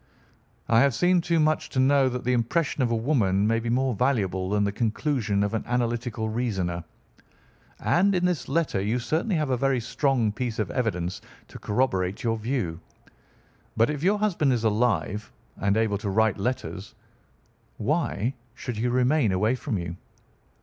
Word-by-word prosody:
"I 115 Hz, -, +4 dB
have 135 Hz, -1 st, +3 dB
seen 175 Hz, +6 st, +3 dB
too 165 Hz, 0 st, +1 dB
much 155 Hz, 0 st, +2 dB
not -, -, -19 dB
to 130 Hz, -, 0 dB
know 135 Hz, 0 st, +4 dB
that 125 Hz, 0 st, -4 dB
the 125 Hz, -, +1 dB
impression 135 Hz, +6 st, 0 dB
of 125 Hz, -, +2 dB
a 115 Hz, -, +1 dB
woman 110 Hz, -6 st, +1 dB
may 115 Hz, +1 st, +2 dB
be 115 Hz, 0 st, -4 dB
more 130 Hz, +2 st, +1 dB
valuable 100 Hz, -6 st, 0 dB
than 105 Hz, 0 st, +1 dB
the 100 Hz, -, +1 dB
conclusion 110 Hz, -1 st, 0 dB
of 100 Hz, -, -1 dB
an 110 Hz, -, -1 dB
analytical 120 Hz, -1 st, -1 dB
reasoner. 95 Hz, -7 st, -2 dB, 1.0 s
And 195 Hz, +3 st, +2 dB
in 180 Hz, 0 st, +1 dB
this 180 Hz, -4 st, -1 dB
letter 160 Hz, -12 st, 0 dB
you 105 Hz, +5 st, 0 dB
certainly 160 Hz, -, -1 dB
have 150 Hz, -4 st, 0 dB
a 130 Hz, -, +2 dB
very 135 Hz, 0 st, +1 dB
strong 120 Hz, -2 st, 0 dB
piece 120 Hz, 0 st, -3 dB
of 105 Hz, -5 st, -2 dB
evidence 95 Hz, -7 st, -2 dB, 0.3 s
to -, -, -10 dB
corroborate 100 Hz, -5 st, 0 dB
your 115 Hz, -1 st, 0 dB
view. 110 Hz, -8 st, -2 dB, 1.0 s
But 115 Hz, +5 st, +3 dB
if 145 Hz, -2 st, -4 dB
your 195 Hz, +5 st, +3 dB
husband 175 Hz, -10 st, +1 dB
is 120 Hz, -2 st, -1 dB
alive 105 Hz, -3 st, 0 dB, 0.3 s
and 100 Hz, +2 st, +1 dB
able 110 Hz, -3 st, +1 dB
to 105 Hz, -, -3 dB
write 110 Hz, 0 st, +2 dB
letters, 110 Hz, -3 st, -4 dB, 0.8 s
why 120 Hz, +6 st, -1 dB, 0.2 s
should 125 Hz, -3 st, -5 dB
he 115 Hz, +3 st, 0 dB
remain 125 Hz, -1 st, +2 dB
away 105 Hz, +6 st, +2 dB
from 130 Hz, -3 st, -3 dB
you?" 85 Hz, -1 st, -5 dB
120 Hz, 175 wpm, -26 LUFS, 105-135 Hz, 1.0 s, I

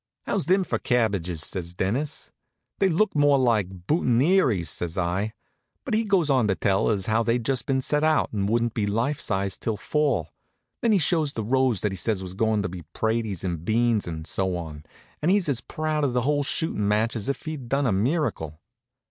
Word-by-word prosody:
"How's -, -, -1 dB
thim 190 Hz, +4 st, +3 dB
for -, -, -2 dB
cabbages?" 100 Hz, -, 0 dB
says 90 Hz, -2 st, -4 dB
Dennis. 125 Hz, +12 st, -2 dB, 0.5 s
"They 195 Hz, -, +4 dB
look 195 Hz, +5 st, +2 dB
more 145 Hz, -1 st, +4 dB
like 100 Hz, -8 st, 0 dB
boutonnieres," 130 Hz, -, +2 dB
says 85 Hz, +1 st, -3 dB
I. 95 Hz, +5 st, -1 dB, 0.5 s
But 255 Hz, -, -3 dB
he 220 Hz, +1 st, +2 dB
goes 195 Hz, -6 st, +2 dB
on 130 Hz, -6 st, +3 dB
to 95 Hz, -, +1 dB
tell 95 Hz, 0 st, +1 dB
as 100 Hz, -4 st, 0 dB
how 110 Hz, +1 st, +2 dB
they'd 115 Hz, 0 st, 0 dB
just 135 Hz, -1 st, -1 dB
been 130 Hz, -1 st, +1 dB
set 150 Hz, +3 st, 0 dB
out 155 Hz, -5 st, +2 dB
and 100 Hz, -1 st, 0 dB
wouldn't 115 Hz, 0 st, +1 dB
be 105 Hz, -2 st, -1 dB
life 115 Hz, +8 st, 0 dB
size 95 Hz, -2 st, -2 dB
till 110 Hz, -2 st, -2 dB
fall. 125 Hz, -, 0 dB, 0.5 s
Then 230 Hz, -, +2 dB
he 210 Hz, -, +5 dB
shows 155 Hz, -3 st, +1 dB
the 110 Hz, -, -3 dB
rows 130 Hz, -1 st, +1 dB
that 105 Hz, -, 0 dB
he -, -, -4 dB
says 100 Hz, 0 st, -1 dB
was 90 Hz, -1 st, -6 dB
goin' 110 Hz, +1 st, +1 dB
to -, -, -1 dB
be 90 Hz, 0 st, -7 dB
praties 110 Hz, -4 st, -1 dB
and 85 Hz, -4 st, -3 dB
beans 115 Hz, 0 st, +1 dB
and 80 Hz, -2 st, -5 dB
so 95 Hz, 0 st, -1 dB
on, 75 Hz, -3 st, -8 dB, 0.4 s
and 155 Hz, -, +1 dB
he's 195 Hz, -2 st, +3 dB
as 130 Hz, -5 st, 0 dB
proud 155 Hz, -1 st, -2 dB
of 135 Hz, -4 st, +1 dB
the 125 Hz, -, +2 dB
whole 145 Hz, +3 st, +1 dB
shootin' 140 Hz, -7 st, -1 dB
match 110 Hz, +4 st, +1 dB
as 110 Hz, +2 st, -3 dB
if 140 Hz, -, -3 dB
he'd 150 Hz, -6 st, -6 dB
done 140 Hz, +2 st, +1 dB
a 120 Hz, -, +2 dB
miracle. 100 Hz, -, -1 dB
115 Hz, 205 wpm, -25 LUFS, 95-145 Hz, 0.5 s, he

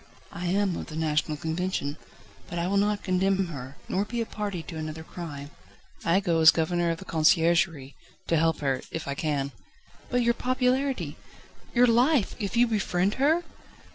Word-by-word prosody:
"I 175 Hz, +1 st, -4 dB
am 195 Hz, 0 st, +1 dB
of -, -, -6 dB
the 155 Hz, -, -8 dB
National 155 Hz, -1 st, 0 dB
Convention. 160 Hz, -2 st, -2 dB, 0.5 s
But 175 Hz, -, -5 dB
I 170 Hz, -, 0 dB
will 200 Hz, +2 st, +1 dB
not 205 Hz, +1 st, +1 dB
condemn 190 Hz, 0 st, +1 dB
her, 135 Hz, -3 st, -8 dB
nor 195 Hz, -, 0 dB
be 235 Hz, +3 st, -4 dB
a 230 Hz, -, 0 dB
party 205 Hz, -6 st, -4 dB
to 160 Hz, +2 st, -8 dB
another 155 Hz, 0 st, -5 dB
crime. 150 Hz, -4 st, -8 dB, 0.5 s
I 170 Hz, +3 st, +3 dB
go 170 Hz, -4 st, +1 dB
as 160 Hz, -, +10 dB
Governor 170 Hz, +1 st, +2 dB
of 165 Hz, -, -1 dB
the 190 Hz, -, -10 dB
Conciergerie, 165 Hz, -3 st, +2 dB, 0.3 s
to 165 Hz, -, +1 dB
help 160 Hz, 0 st, +2 dB
her, 135 Hz, -2 st, 0 dB
if 165 Hz, -, -5 dB
I 140 Hz, -, -1 dB
can." 140 Hz, -2 st, -1 dB, 0.6 s
"But 245 Hz, -1 st, +1 dB
your 235 Hz, 0 st, +3 dB
popularity 255 Hz, +2 st, 0 dB, 0.6 s
your 245 Hz, +1 st, +6 dB
life 245 Hz, +2 st, +3 dB
if 205 Hz, +2 st, -2 dB
you 240 Hz, -, +6 dB
befriend 205 Hz, -4 st, 0 dB
her?" 320 Hz, +5 st, +3 dB
175 Hz, 175 wpm, -27 LUFS, 160-210 Hz, 0.6 s, as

